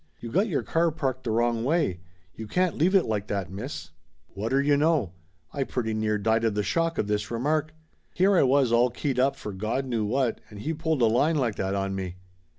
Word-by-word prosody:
"You 115 - -7
got 195 - +2
your 165 -9 -1
car 165 +1 +2
parked 135 -5 -3
the - - -1
wrong 115 +1 +1
way. 145 - +1 0.3
You 110 +3 -8
can't 180 +8 +1
leave 180 +6 +2
it 190 - +5
like 105 -2 -2
that, 95 -3 -3
miss!" 95 - -6 0.4
Whatter 115 +7 -1
you 145 +1 +3
know! 145 - +2 0.4
I 140 - 0
pretty 115 -4 -2
near 110 -1 0
died 110 +2 +1
of 110 -2 +1
the 105 - 0
shock 165 - 0
of - - +1
this 105 +1 -1
remark. 155 +6 -1 0.4
Here 190 +2 +4
I - - +5
was 135 -2 +3
all 120 +1 +4
keyed 125 +2 -2
up 135 +2 +3
for 105 - -7
Gawd 110 +7 -2
knew 120 -4 -1
what, 120 +3 0
and 105 -1 -10
he 160 +6 -2
pulled 160 -4 0
a - - +7
line 130 +9 +3
like 125 -7 +1
that 95 +1 -1
on 95 0 -1
me. 95 -2 -4
120 Hz, 225 wpm, -26 LUFS, 105-150 Hz, 0.4 s, a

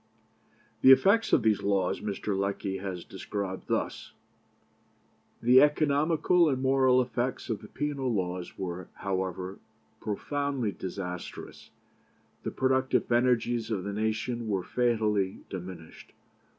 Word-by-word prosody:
'" 110 0 -35
The 130 - +8
effects 200 +11 +5
of 125 - +4
these 105 -2 +3
laws 95 -2 0
Mr. 105 0 -2
Lecky 100 0 -2
has 95 -2 -5
described 95 0 -5
thus: - - -2 1.3
"The 125 +2 +7
economical 155 +3 +3
and 130 -2 0
moral 130 -1 +4
effects 125 +1 -3
of 105 - -3
the 105 - -10
penal 140 -2 -2
laws 90 -4 -3
were, 90 -1 -5
however, 95 -1 -3 0.4
profoundly 135 +2 -2
disastrous. 90 -2 -7 0.7
The - - -3
productive 130 -1 +1
energies 120 -1 +2
of 100 -5 -2
the 100 +1 -4
nation 110 +2 -2
were 95 -4 0
fatally 105 -4 0
diminished. 90 -3 -9
110 Hz, 120 wpm, -29 LUFS, 95-130 Hz, 1.3 s, The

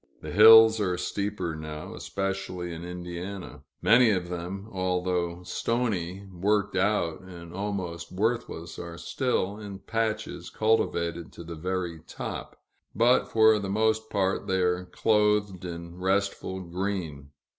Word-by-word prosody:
The - - -5
hills 110 +2 +9
are 90 -3 0
steeper, 95 -2 -2
now, 75 0 -7
especially 95 -3 -3
in 85 +1 -7
Indiana; 90 +2 -6 0.2
many 120 +1 +6
of 90 -4 0
them, 90 +3 -5
although 90 -2 -1
stony, 100 -4 -2
worked 100 +3 +1
out, 95 -4 +1
and 85 -3 -11
almost 95 -3 -4
worthless, 100 -4 -2
are 85 -1 -7
still, 105 -3 -1
in 100 -2 -7
patches, 110 -5 -3
cultivated 85 -6 0
to - - -9
the 85 0 -7
very 90 0 -3
top; - - -6 0.4
but 120 +4 +4
for 110 -1 +5
the 100 -1 -4
most 110 +2 +1
part 95 -1 0
they 95 0 +1
are 90 0 +1
clothed 105 -2 +1
in 85 0 -7
restful 95 0 -1
green. 85 -5 -4
95 Hz, 130 wpm, -27 LUFS, 85-105 Hz, 0.4 s, hills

